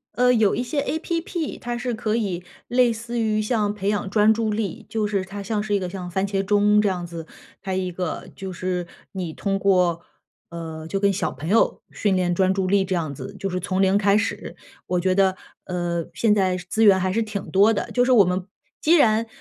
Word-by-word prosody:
呃， 250 0 +4
有 220 -4 +3
一 245 - -1
些 260 +4 -1
app， 330 +2 -3
它 240 -1 -4
是 245 0 -2
可 220 -1 -1
以 190 -6 -2 0.2
类 245 0 +3
似 230 +1 -5
于 215 -1 +1
像 210 -2 0
培 200 -2 -4
养 205 -1 0
专 210 +2 +4
注 220 -1 -1
力， 220 +1 -3
就 220 -2 -1
是 200 -2 -1
它 195 +2 -7
像 205 +1 -2
是 210 -1 -2
一 200 - +3
个 185 -1 -4
像 180 -1 -6
番 190 +3 0
茄 195 -1 -1
钟 210 +1 +4
这 210 - +2
样 180 -2 -3
子。 165 -1 -7 0.4
还 190 -1 -3
一 185 -1 -2
个 180 -1 -4
就 190 -1 -6
是 180 -1 -3 0.3
你 180 -4 -4
通 195 +4 -2
过 180 -4 +2 0.5
呃， 160 -2 -7
就 195 +4 -2
跟 200 0 +3
小 190 - -1
朋 155 - -8
友 215 +6 +2
训 205 -2 0
练 180 -1 +1
专 190 +1 +3
注 190 -1 -1
力 195 +1 +3
这 190 - -3
样 160 -5 -2
子， 200 - -8
就 195 - -2
是 185 0 -2
从 185 +2 -1
零 195 +1 +4
开 205 0 +3
始。 215 - -3 0.3
我 180 - 0
觉 185 +1 +1
得， 190 -1 +3 0.3
呃， 175 -2 -2
现 215 -2 +2
在 185 -2 +1
资 185 +5 -1
源 195 -3 +7
还 185 0 0
是 225 +2 +1
挺 210 -3 -5
多 205 +4 +5
的。 205 - -3
就 245 - +3
是 255 - +2
我 220 -6 +7
们 180 +1 -1 0.4
既 320 - +4
然， 225 -4 +3
200 Hz, 250 characters per minute, -23 LUFS, 185-220 Hz, 0.5 s, 源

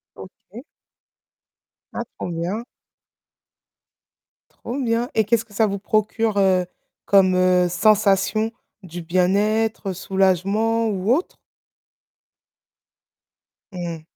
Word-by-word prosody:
OK. 195 +4 -13 1.3
Ah, 235 - -3
trop - - -5
bien. 175 +7 -3 2.0
Trop 250 - -4
bien. 235 -1 0
Et 220 - +2
qu'est-ce 225 +2 +1
que 225 - -22
ça 220 +2 +3
vous 200 -1 -3
procure, 215 +1 0
heu, 185 -2 +3 0.4
comme, 190 -2 +4
heu, 180 0 +3
sensation, 210 +3 +2 0.3
du 175 0 -8
bien-être, 200 +4 0
soulagement 195 +5 0
ou 200 +1 0
autre? 325 +8 -1 2.4
Mmh. 170 -3 -6
200 Hz, 95 wpm, -21 LUFS, 185-220 Hz, 2.4 s, comme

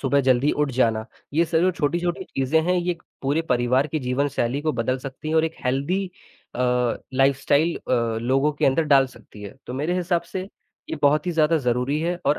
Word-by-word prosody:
सुबह 140 +1 +2
जल्दी 130 +2 +3
उठ 145 - 0
जाना, 110 -3 +2 0.3
ये 165 - +4
सब 160 0 0
जो 185 +2 +3
छोटी-छोटी 175 +3 -1
चीज़ें 135 +4 0
हैं, 180 +2 +1
ये 180 0 0
क 170 - -25 0.2
पूरे 145 +4 +1
परिवार 125 +3 +2
की 155 +1 -2
जीवनशैली 130 0 -1
को 155 - 0
बदल 125 +2 -1
सकती 135 +3 -7
हैं 160 - -1
और 160 - +4
एक 160 0 -3
हेल्दी 140 +10 0 0.5
अ, - - -4 0.5
लाइफ़स्टाइल 140 +4 +2
अ, 115 -3 -1
लोगों 135 +5 +1
के 145 - 0
अंदर 135 +5 +3
डाल 135 -1 +6
सकती 105 -4 -15
है। 100 - -8
तो 125 - -5
मेरे 150 +6 -1
हिसाब 175 -1 0
से 185 - -2 0.5
ये - - -2
बहुत 150 +4 +3
ही - - +1
ज़्यादा 160 0 +3
ज़रूरी 125 +2 0
है, 175 +2 -1
और 150 - +3
140 Hz, 210 wpm, -23 LUFS, 130-165 Hz, 0.5 s, डाल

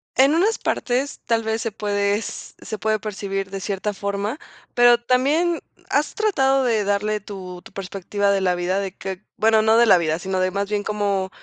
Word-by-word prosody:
En 275 +4 +5
unas 410 +7 +2
partes, 260 +3 -1
tal 225 -1 +1
vez 220 0 -1
se 225 - -2
puede, 205 -1 0
s 215 - -6
se 215 - -5
puede 215 +2 0
percibir 195 -2 -4
de 195 0 -6
cierta 200 +1 -2
forma, 200 +6 -3 0.3
pero 240 0 +6
también 290 +8 +2 0.3
¿has 295 +2 0
tratado 270 -11 +2
de 225 -4 +2
darle 205 +1 0
tu 185 -3 -8
tu - - -14
perspectiva 195 +1 -2
de 200 -1 +2
la 180 -1 +2
vida?, 180 +2 0
de 195 -1 -3
que 190 +1 -6
bueno 220 0 +4
no 220 +1 +4
de 235 - +6
la 205 - +7
vida, 160 -1 0
sino 190 +1 -2
de 185 0 +1
más 200 +1 -2
bien 205 -1 -1
¿cómo 200 -3 -1
205 Hz, 200 wpm, -22 LUFS, 195-235 Hz, 0.3 s, la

